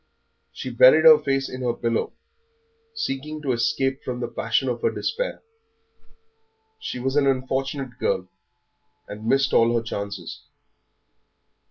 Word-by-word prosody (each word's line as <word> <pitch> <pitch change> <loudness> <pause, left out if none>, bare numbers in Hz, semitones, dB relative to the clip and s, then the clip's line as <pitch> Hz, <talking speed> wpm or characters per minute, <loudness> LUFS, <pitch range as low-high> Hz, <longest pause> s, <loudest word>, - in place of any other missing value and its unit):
She 130 - -6
buried 130 +7 +6
her 155 -1 +9
face 135 -2 -1
in 130 - -7
her 120 -2 -1
pillow, 115 -1 -2 0.8
seeking 155 - -4
to 135 - 0
escape 125 +3 0
from 125 -1 -5
the 125 - -3
passion - - -1
of - - -2
her 460 - +2
despair. - - -3 1.4
She 440 - -5
was 135 +2 -2
an 145 -2 +3
unfortunate 135 0 -2
girl, - - -1 0.8
and 105 - -8
had 110 - -8
missed 135 +2 +2
all 115 +1 +4
her 115 - 0
chances. 100 -2 -6
130 Hz, 140 wpm, -23 LUFS, 120-140 Hz, 1.4 s, her